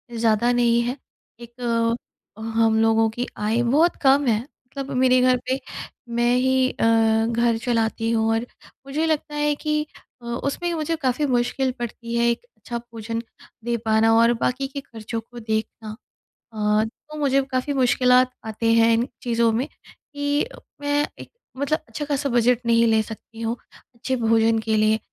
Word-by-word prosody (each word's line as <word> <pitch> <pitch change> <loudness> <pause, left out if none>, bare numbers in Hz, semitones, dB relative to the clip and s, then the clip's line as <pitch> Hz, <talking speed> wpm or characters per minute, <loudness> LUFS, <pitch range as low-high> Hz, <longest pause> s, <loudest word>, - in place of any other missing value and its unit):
ज़्यादा 230 +1 +2
नहीं 235 -1 +3
है। 245 +4 -2 0.4
एक 240 +1 -13 0.8
अ, - - -10
हम 225 0 +2
लोगों 225 0 +3
की 240 +3 -4
आय 220 +3 0
बहुत 305 +8 +3
कम 275 +1 +5
है। 220 -2 +3
मतलब 275 0 -9
मेरे 255 0 +4
घर 255 0 +4
पे 265 +1 +1 0.5
मैं 240 +1 +2
ही 260 0 +2
अ, - - -1 0.4
घर 235 0 +1
चलाती 225 -1 0
हूँ 225 -1 +1
और 225 +2 -1 0.4
मुझे 305 +4 -1
लगता 300 -1 -1
है 295 0 +1
कि 300 0 -1 0.4
अ, - - -13
उसमें 280 +8 -2
मुझे 325 0 -1
काफ़ी 285 -1 0
मुश्किल 255 +1 0
पड़ती 235 0 -5
है 235 - +3
एक 235 - -2
अच्छा 240 - -5
भोजन 230 -1 -6 0.4
दे 235 0 -1
पाना 220 +1 +4
और 230 +1 +5
बाकी 265 +3 -1
के 280 0 -6
ख़र्चों 225 -2 -6
को 240 +2 -12
देखना। 220 -1 -4 0.6
अ, 210 0 +2 0.3
तो 305 - -8
मुझे 275 -1 +3
काफ़ी 255 +3 -1
मुश्किलात 250 -1 +4
आते 225 +1 0
हैं 230 0 +5
इन 235 +3 +1
चीज़ों 235 -1 +2
में 245 +5 -1
कि 285 +1 -4 0.4
मैं 290 0 +1
एक - - -10 0.3
मतलब 305 +3 0
अच्छा-खासा 285 +3 -2
बजट 240 0 +2
नहीं 230 0 +4
ले 220 -1 +3
सकती 225 +1 -10
हूँ, 230 +1 -1 0.4
अच्छे 260 +2 -2
भोजन 225 0 +3
के 220 0 -1
लिए। 215 +1 +3
240 Hz, 165 wpm, -23 LUFS, 225-270 Hz, 0.8 s, कम